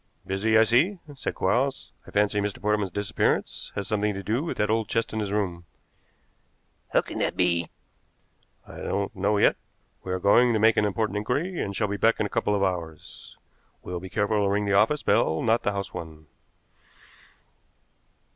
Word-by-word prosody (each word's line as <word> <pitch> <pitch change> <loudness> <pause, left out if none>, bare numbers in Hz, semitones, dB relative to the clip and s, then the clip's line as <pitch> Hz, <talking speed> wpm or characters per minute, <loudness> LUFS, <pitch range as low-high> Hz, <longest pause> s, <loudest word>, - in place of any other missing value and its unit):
"Busy, 110 +4 +1
I 110 - +7
see," 135 - +3 0.2
said 135 - -4
Quarles. 130 +8 0 0.2
"I - - -10
fancy 105 0 +1
Mr. 100 0 -3
Portman's 105 -2 0
disappearance 100 +2 -1
has 100 - -3
something 105 -1 0
to 100 - -5
do 115 - -1
with 170 - -4
that 105 0 +1
old 110 -2 0
chest 115 -1 -1
in 110 - -2
his 105 -2 -2
room." 90 -5 -2 1.3
"How - - +4
can - - -7
that - - -1
be?" 85 -2 +1 1.0
"I - - -11
don't 100 0 -3
know 100 +2 +1
yet. - - +4 0.5
We 95 - -5
are 95 - -1
going 120 +6 +4
to 110 - +1
make 110 +1 +5
an 105 - +2
important 105 +1 -1
inquiry 145 - -2
and 100 - -3
shall 105 - 0
be 100 0 -3
back 115 +2 +2
in - - +1
a - - -3
couple 105 - +1
of 100 - 0
hours. 85 -5 -5 0.5
We'll 90 -1 -5
be 95 +1 -9
careful 105 0 +1
to 100 - +2
ring 105 +1 0
the 100 - 0
office 110 +9 +3
bell, 80 - +2
not 115 0 +2
the 105 - 0
house 100 -1 -4
one." 80 -2 -8
105 Hz, 190 wpm, -26 LUFS, 95-110 Hz, 1.3 s, I